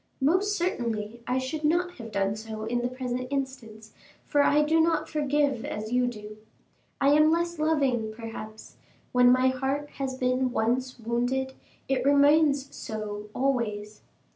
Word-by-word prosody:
"Most 375 +9 +2
certainly 235 - -2
I 250 - +1
should 260 +4 -3
not 350 +3 +1
have 230 -3 -8
done 200 0 0
so 220 0 -7
in 240 +2 -1
the 245 - 0
present 255 0 -4
instance, 235 -6 -5 0.3
for 290 - +2
I 295 +1 +4
do 320 +2 +3
not 330 0 +1
forgive 290 -4 0
as 215 +1 -5
you 250 0 +2
do. 215 -3 -7 0.6
I 275 - +4
am 305 +2 +5
less 340 0 0
loving, 275 -8 +1
perhaps; 220 -1 -9 0.3
when 250 0 +5
my 255 +1 +4
heart 270 +3 -2
has 265 -1 -3
been 255 0 +1
once 255 +3 0
wounded, 245 +3 -1 0.3
it 265 -2 0
remains 285 0 +4
so 210 -1 -6
always." 215 -6 -1
255 Hz, 150 wpm, -27 LUFS, 225-285 Hz, 0.6 s, am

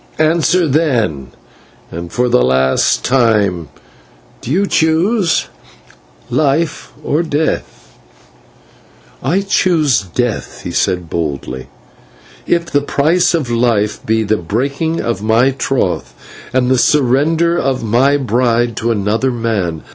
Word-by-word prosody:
Answer 165 +2 +2
then, 120 - 0 0.6
and 85 +1 -7
for 125 0 0
the 90 - +3
last 65 +1 +2
time: 105 - +1 0.7
Do - - -8
you 185 +8 +2
choose 170 +2 +1 0.8
life 145 +5 -1
or 150 - 0
death?" 150 - -3 1.3
"I 190 +4 +1
choose 170 - +2
death," 110 +5 -3
he - - -5
said, 90 -2 -1
boldly, 70 -6 -4 0.8
"if 170 -1 +1
the 145 -4 0
price 160 +5 +1
of 140 -8 -2
life 115 -3 0
be 110 0 +1
the 110 +1 0
breaking 140 - -2
of 115 -5 -2
my 115 +5 +3
troth 125 - -2 0.4
and 125 0 +1
the 130 - +3
surrender 150 +6 +2
of 130 -3 -1
my 125 +6 +2
bride 120 -2 0
to 115 - -1
another 110 +4 0
man. 110 -9 -2
125 Hz, 115 wpm, -15 LUFS, 105-155 Hz, 1.3 s, the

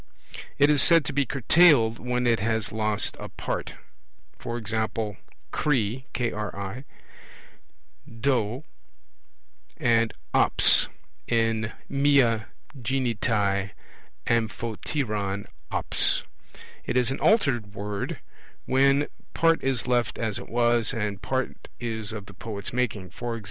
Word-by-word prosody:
It 145 +1 +5
is 145 -2 +4
said 165 -3 +5
to 145 - -3
be 140 -2 +1
curtailed, 135 -3 +4
when 125 0 -1
it 115 -2 +3
has 110 -1 -1
lost 110 -1 0
a - - -7
part; - - -5 0.7
e.g. 115 -2 -3 0.7
kri, 130 -3 0 2.1
do, 125 0 0 1.1
and 115 -1 +2 0.2
ops - - +6 0.4
in 115 -1 +1 0.2
mia 135 -6 +3 0.3
ginetai 115 -6 0 0.6
amphoteron 110 -2 -2 0.2
ops. - - +2 0.6
It 125 - -1
is 125 0 +2
an 135 - -3
altered 120 - +2
word, 100 0 -4 0.5
when 135 +2 +3 0.3
part 165 0 +3
is 135 -3 0
left 120 -1 0
as 110 -3 -2
it - - -10
was 120 +1 +2
and 105 -3 -3
part 130 +4 -3
is 110 -3 -3
of 105 -3 -7
the - - -13
poet's 105 -2 -6
making; 110 -7 -2
e.g. 120 -1 -4
115 Hz, 105 wpm, -26 LUFS, 110-130 Hz, 2.1 s, ops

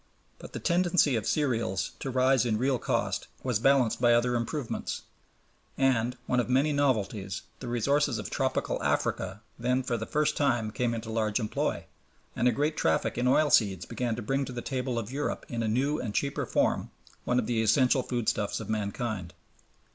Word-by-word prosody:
But - - -11
the - - -4
tendency 175 -5 +3
of 110 - -2
cereals 115 - 0
to 135 - -4
rise 130 -1 +3
in 115 -3 +1
real 130 +1 +1
cost - - -1 0.2
was 125 -5 0
balanced 130 -2 +3
by 120 -1 +5
other 125 +1 +2
improvements; 120 +2 -3 0.7
and 125 -2 +2
one 125 - +1
of 125 - -1
many 135 +4 +3
novelties 105 -9 0 0.2
the 125 - -7
resources 135 +2 +1
of - - -6
tropical - - -1
Africa 95 +4 -1 0.2
then 125 +2 +1
for 120 -2 -1
the 110 - -5
first 150 0 +1
time 120 -7 +1
came 120 +1 -1
into 110 0 -5
large 110 0 0
employ, 110 -2 -2 0.5
and 125 - +2
a - - +5
great 150 +4 0
traffic 80 - +1
in 125 +1 0
oil 150 +3 +4
seeds 95 -6 +3
began 120 -3 -2
to 120 - -6
bring 135 +5 0
to 130 - -7
the 120 - -5
table 130 -2 -2
of 115 0 -3
Europe 145 +2 -3
in 120 -1 -2
a 115 - 0
new 135 +7 +1
and 105 -4 -4
cheaper 140 0 -1
form - - +1 0.3
one 125 - +1
of 125 - +1
the 115 0 0
essential 125 +4 +4
foodstuffs 115 -4 -1
of - - -5
mankind. 100 -3 -3
120 Hz, 185 wpm, -28 LUFS, 110-135 Hz, 0.7 s, by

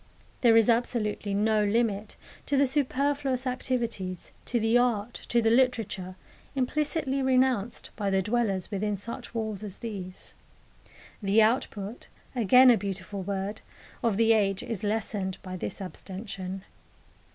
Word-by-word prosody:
There 230 -2 +6
is 225 - +5
absolutely 225 -4 +1
no 215 +1 +3
limit 210 -1 0 0.3
to 285 - +1
the 280 - +5
superfluous 275 -1 0
activities, 235 -8 -3
to 240 - 0
the 225 +1 +2
art, 240 -2 +2 0.2
to 235 -1 +3
the 225 - +4
literature, 225 -7 +1 0.4
implicitly 275 +1 0
renounced 255 -4 +1
by 205 -3 -1
the 190 -1 +2
dwellers 210 -3 0
within 205 0 -1
such 235 +4 -8
walls 220 -3 -2
as 205 -3 -7
these. 195 -6 -7 0.9
The 205 +2 +4
output 215 -1 -1 0.3
again 250 +3 +7
a 235 - +5
beautiful 195 0 -4
word 195 +2 -3 0.4
of 225 -4 +1
the 225 0 +5
age 195 -2 +1
is 230 -6 -5
lessened 205 -3 -1
by 185 -1 -6
this 185 - -5
abstention. 190 0 -7
220 Hz, 135 wpm, -28 LUFS, 195-245 Hz, 0.9 s, again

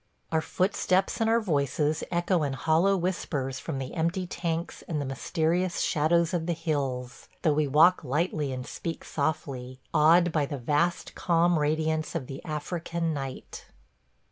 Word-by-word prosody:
Our 160 -1 +2
footsteps 185 +3 0
and 225 - +3
our 230 +1 +4
voices 150 - 0
echo 175 0 +1
in 140 -2 -1
hollow 165 +8 +2
whispers 145 -7 -2
from 155 -4 -4
the 135 -1 -5
empty 170 +3 0
Tanks 170 -1 -3
and 155 -3 -2
the 145 - -2
mysterious 170 +6 0
shadows 165 +2 +2
of 170 -1 -1
the 175 - +1
hills, 140 -6 -3 0.2
though 155 - +4
we 150 0 +1
walk 160 +6 +5
lightly 150 +1 -1
and 130 -1 -5
speak 165 -1 -5
softly, 130 -4 -3
awed 165 +3 +5
by 150 -3 +1
the 145 - -4
vast 150 +7 0
calm 170 -1 +2
radiance 155 +2 0
of 155 -6 -2
the 135 +1 -8
African 165 +1 -3
night. 135 -2 -6
160 Hz, 155 wpm, -28 LUFS, 145-175 Hz, 0.2 s, walk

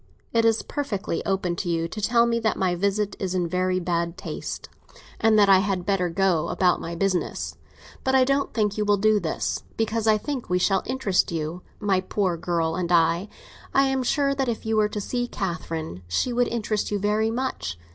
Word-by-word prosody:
It 230 -1 +3
is 225 -1 +3
perfectly 210 - -3
open 190 -3 0
to 175 - -2
you 165 -1 0
to 215 - -6
tell 235 +2 +4
me 235 0 +1
that 220 -1 0
my 185 -2 +1
visit 200 +3 0
is 185 -1 -2
in 175 -2 +1
very 185 +1 0
bad 170 0 -1
taste - - -6 0.5
and 220 -1 +4
that 205 -1 +6
I 195 -1 +7
had 190 -2 -1
better 185 -3 +1
go 170 -2 +1
about 180 -2 +2
my 170 +1 -5
business. 185 0 -1 0.5
But 265 0 +2
I 260 - +6
don't 275 +2 +1
think 210 -2 0
you - - +2
will 205 0 +3
do 215 +1 +3
this; 165 -4 -2 0.2
because 225 0 0
I 215 -1 +5
think 265 +2 -5
we 180 - +2
shall 190 +1 +2
interest 240 -8 +1
you, 165 +2 -3 0.2
my 195 -3 +1
poor 185 -1 0
girl 165 -1 -1
and 180 -1 -2
I. 170 +3 +3 0.5
I 275 - +6
am 265 -1 0
sure 275 +2 +1
that 270 -2 -1
if 225 - -4
you 220 0 0
were 210 -1 +3
to 210 - -4
see 245 +4 -2
Catherine, 165 - -4
she 240 - 0
would 245 0 +2
interest 215 -2 -1
you 205 - 0
very 210 +2 +1
much. 230 - -3
200 Hz, 205 wpm, -25 LUFS, 180-225 Hz, 0.5 s, I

